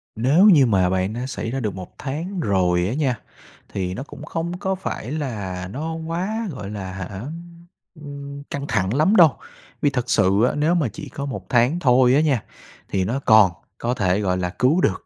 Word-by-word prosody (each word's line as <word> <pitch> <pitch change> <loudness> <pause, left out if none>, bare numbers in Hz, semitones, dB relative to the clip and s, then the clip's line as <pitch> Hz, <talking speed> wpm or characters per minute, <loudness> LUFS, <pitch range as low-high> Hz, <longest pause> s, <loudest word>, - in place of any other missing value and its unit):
Nếu 140 - +4
như 145 -9 +7
mà 95 -5 +3
bạn 95 +2 0
đã 120 +2 -4
xảy 120 -3 -4
ra 135 - -2
được 105 -5 -2
1 95 -1 -9
tháng 165 +8 -4
rồi 90 - +2
á 110 - -2
nha, 135 -4 0 0.5
thì 90 -2 -3
nó 130 +8 -5
cũng 150 - -11
không 170 +3 -3
có 190 0 -1
phải 180 - -5
là 105 -11 -4
nó 155 +10 -4
quá, 175 +8 -3
gọi 105 -7 -7
là, 95 -3 -6
hả, 95 -2 -5 0.2
ưm, 170 +2 -10 0.4
ưm, 140 -1 -8
căng 140 0 -4
thẳng 105 -2 0
lắm 155 - +3
đâu. 160 - +6 0.4
Vì 145 - +4
thật 125 -3 -3
sự 100 +1 +3
á, 125 - +2
nếu 155 +4 +2
mà 155 -7 +1
chỉ 155 -4 -8
có 140 - -5
1 140 - -5
tháng 125 +7 +3
thôi 125 -4 +4
á 150 - +4
nha, 140 -8 +1 0.5
thì 95 -1 0
nó 125 +7 -1
còn 110 -8 +6 0.3
có 120 +1 -1
thể, 95 -5 +1
gọi 95 -3 0
là, 90 -1 -1
cứu 150 +9 +3
được, 95 - 0
130 Hz, 210 wpm, -22 LUFS, 100-155 Hz, 0.5 s, như